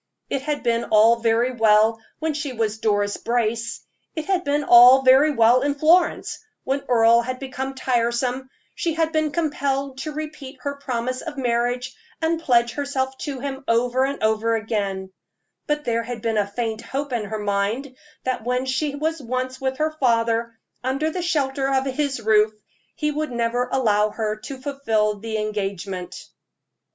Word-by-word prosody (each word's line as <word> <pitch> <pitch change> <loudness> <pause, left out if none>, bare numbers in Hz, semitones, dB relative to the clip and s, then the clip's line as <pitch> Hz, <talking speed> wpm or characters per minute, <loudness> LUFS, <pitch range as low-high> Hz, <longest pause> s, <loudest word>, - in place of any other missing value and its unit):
It 275 - 0
had 295 +1 -3
been 235 -1 +1
all 220 +2 +5
very 230 +2 +1
well 220 -1 +3 0.2
when 315 0 -2
she 290 -2 -4
was 220 -2 -2
Doris 205 -2 0
Brace 230 -1 -1 0.3
it 315 -1 -3
had 380 -2 0
been 290 +1 0
all 250 +1 +8
very 265 +4 +6
well 240 -1 +4
in 285 +1 0
Florence, 330 +5 +2 0.2
when 270 +1 -1
Earle 235 -1 +5
had 255 +2 -4
become 265 0 -5
tiresome, 250 +1 -1 0.2
she 330 -2 -2
had 325 -1 +1
been 310 -1 +1
compelled 280 -4 -1
to 310 - -4
repeat 300 -3 -7
her 280 - -3
promise 255 -1 -3
of 320 -4 -7
marriage, 245 0 -1 0.2
and 325 0 0
pledge 240 -5 +3
herself 265 -1 -2
to 275 -4 -5
him 270 0 -5
over 245 +3 +2
and 275 -3 -2
over 220 +1 +2
again; 200 -4 -3 0.6
but 295 0 0
there 230 -1 +1
had 230 -1 -7
been 225 -2 +1
a 205 - 0
faint 220 +1 -3
hope 275 0 -4
in 230 -3 -1
her 215 +2 -4
mind 210 +6 -2 0.3
that 255 -3 -2
when 250 +2 -1
she 280 +2 -1
was 315 +1 -2
once 255 +2 -3
with 265 0 -1
her 310 +1 0
father, 230 -5 0 0.3
under 275 +5 0
the 360 - -3
shelter 275 -5 0
of 265 0 +1
his 275 0 -1
roof, 215 -1 +3 0.4
he 300 -1 -1
would 305 -1 -3
never 240 +1 -1
allow 215 -5 +2
her 215 0 -2
to 265 +5 -8
fulfill 225 -7 -1
the 220 +1 -3
engagement. 195 -3 -4
255 Hz, 170 wpm, -23 LUFS, 225-280 Hz, 0.6 s, all